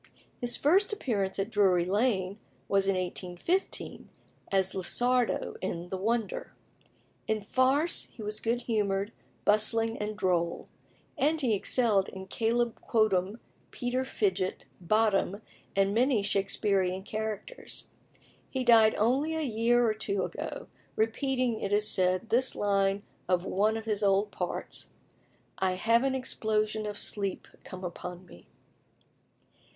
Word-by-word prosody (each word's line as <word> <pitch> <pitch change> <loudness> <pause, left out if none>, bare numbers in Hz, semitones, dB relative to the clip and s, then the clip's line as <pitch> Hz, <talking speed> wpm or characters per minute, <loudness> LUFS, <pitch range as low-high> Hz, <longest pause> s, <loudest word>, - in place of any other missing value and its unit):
His 245 -1 +2
first 380 +9 +3
appearance 210 - -1
at 195 0 -2
Drury 185 -4 +3
Lane 200 -1 0 0.3
was 195 -1 +2
in 195 - +2
1815, 185 - -2 0.4
as 190 -1 +2
Lissardo 245 +6 +1
in 175 -2 -4
"The 190 - -3
Wonder." 235 - -2 0.7
In 220 -1 0
farce 265 - +2
he 225 - -11
was 210 +1 -3
good 235 +2 -1
humoured, 205 -2 0 0.3
bustling, 225 +2 +2
and 210 0 -3
droll; 170 -3 0 0.5
and 310 +3 +2
he 250 -6 +1
excelled 210 -1 +2
in 190 0 -8
Caleb 230 +3 0
Quotem, 205 -3 +1 0.3
Peter 250 +1 -2
Fidget, 195 -7 -1 0.2
Bottom, 205 +1 +1 0.3
and 195 0 +2
many 240 -2 +3
Shaksperean 195 -1 0
characters. 220 - -5 0.6
He 260 -1 -2
died 225 -3 +6
only 270 +9 +1
a 320 - -1
year 240 -1 +2
or 215 - +2
two 200 -3 -1
ago, - - -5 0.3
repeating, 245 +1 0
it 200 - -3
is 210 +1 +4
said, 185 +1 +1
this 255 +3 +2
line 200 -1 +1 0.3
of 180 0 +2
one 215 +3 +1
of 225 - -7
his 210 -2 -1
old 200 +1 +2
parts: - - -4 0.7
"I 190 -1 +2
have 230 +6 +3
an 270 -1 +1
exposition 215 -4 -1
of 205 -1 -5
sleep 200 -2 -3 0.2
come 185 0 -9
upon 180 0 -6
me." 90 - -16
215 Hz, 130 wpm, -29 LUFS, 195-240 Hz, 0.7 s, died